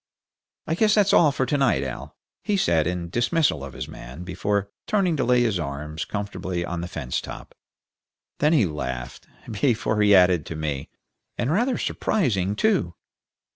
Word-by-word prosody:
I 160 Hz, -, -1 dB
guess 210 Hz, +5 st, +3 dB
that's 205 Hz, -2 st, +3 dB
all 155 Hz, -4 st, +6 dB
for 130 Hz, -1 st, -1 dB
to 145 Hz, +4 st, 0 dB
night, 120 Hz, -, +2 dB
Al," 65 Hz, -3 st, -6 dB, 0.3 s
he 205 Hz, -, +1 dB
said, 80 Hz, -, +2 dB
in 85 Hz, -1 st, -3 dB
dismissal 120 Hz, -, +1 dB
of 70 Hz, -1 st, -8 dB
his -, -, -6 dB
man, 65 Hz, +9 st, -9 dB
before 100 Hz, +2 st, -2 dB, 0.2 s
turning 195 Hz, -6 st, +2 dB
to 130 Hz, -, +1 dB
lay 125 Hz, 0 st, +3 dB
his 110 Hz, -6 st, 0 dB
arms 75 Hz, +1 st, -4 dB
comfortably 95 Hz, -4 st, -4 dB
on 85 Hz, -1 st, -4 dB
the 85 Hz, -, -4 dB
fence 70 Hz, -8 st, -3 dB
top. -, -, -9 dB, 0.9 s
Then 150 Hz, +2 st, +3 dB
he 135 Hz, -10 st, +4 dB
laughed, 65 Hz, -7 st, -5 dB, 0.2 s
before 110 Hz, -1 st, +1 dB
he 105 Hz, -1 st, +6 dB
added, 90 Hz, -3 st, +5 dB
to 80 Hz, -, -5 dB
me, 75 Hz, -3 st, -3 dB, 0.5 s
"And 125 Hz, -, 0 dB
rather 240 Hz, +8 st, +1 dB
surprising, 105 Hz, -, 0 dB
too." 185 Hz, -, +1 dB
100 Hz, 170 wpm, -24 LUFS, -, 0.9 s, all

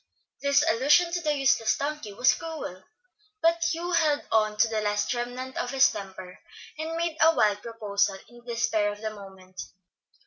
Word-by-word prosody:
This 280 Hz, 0 st, +3 dB
allusion 295 Hz, +9 st, +4 dB
to 345 Hz, 0 st, -2 dB
the 300 Hz, -2 st, 0 dB
useless 265 Hz, -5 st, +2 dB
donkey 290 Hz, -6 st, -4 dB
was 245 Hz, +6 st, +3 dB
cruel, 305 Hz, -, -7 dB, 0.5 s
but 335 Hz, -1 st, +2 dB
Hugh 345 Hz, +2 st, -3 dB
held 310 Hz, -4 st, +2 dB
on 215 Hz, -1 st, +2 dB
to 215 Hz, -, +4 dB
the 220 Hz, -1 st, -2 dB
last 210 Hz, +2 st, 0 dB
remnant 250 Hz, +2 st, -5 dB
of 245 Hz, -, -2 dB
his 270 Hz, 0 st, +4 dB
temper, 190 Hz, -2 st, -9 dB, 0.4 s
and 325 Hz, +1 st, -4 dB
made 335 Hz, -1 st, -2 dB
a 325 Hz, +1 st, +5 dB
wild 205 Hz, -1 st, +2 dB
proposal 205 Hz, -4 st, -1 dB
in 240 Hz, -, -17 dB
the 240 Hz, 0 st, -8 dB
despair 215 Hz, -3 st, +1 dB
of 205 Hz, 0 st, -10 dB
the 220 Hz, -1 st, -4 dB
moment. 190 Hz, -3 st, -11 dB
240 Hz, 175 wpm, -26 LUFS, 205-300 Hz, 0.5 s, a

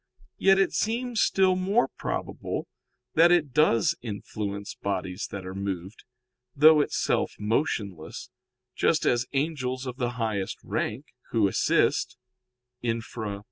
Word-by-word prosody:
Yet 195 Hz, 0 st, +5 dB
it 195 Hz, -, +2 dB
seems 235 Hz, 0 st, 0 dB
still 190 Hz, -1 st, +3 dB
more 195 Hz, +6 st, +2 dB
probable -, -, -4 dB, 0.5 s
that 170 Hz, +2 st, +6 dB
it 155 Hz, -7 st, +2 dB
does 115 Hz, -8 st, +4 dB
influence 100 Hz, -2 st, -5 dB
bodies 95 Hz, 0 st, -3 dB
that 100 Hz, -2 st, -6 dB
are 95 Hz, -, -6 dB
moved, 95 Hz, 0 st, -5 dB, 0.5 s
though 155 Hz, +1 st, +7 dB
itself -, -, 0 dB
motionless, 105 Hz, -, -2 dB, 0.4 s
just -, -, +2 dB
as 120 Hz, +1 st, +2 dB
angels 135 Hz, -3 st, -1 dB
of 125 Hz, -1 st, -5 dB
the 120 Hz, -2 st, -1 dB
highest 105 Hz, -5 st, -2 dB
rank, 125 Hz, +7 st, -2 dB, 0.2 s
who 110 Hz, -4 st, +3 dB
assist -, -, +1 dB, 0.6 s
[*Infra, 115 Hz, -2 st, -3 dB
Q. 100 Hz, -, -7 dB
120 Hz, 125 wpm, -27 LUFS, 100-155 Hz, 0.6 s, though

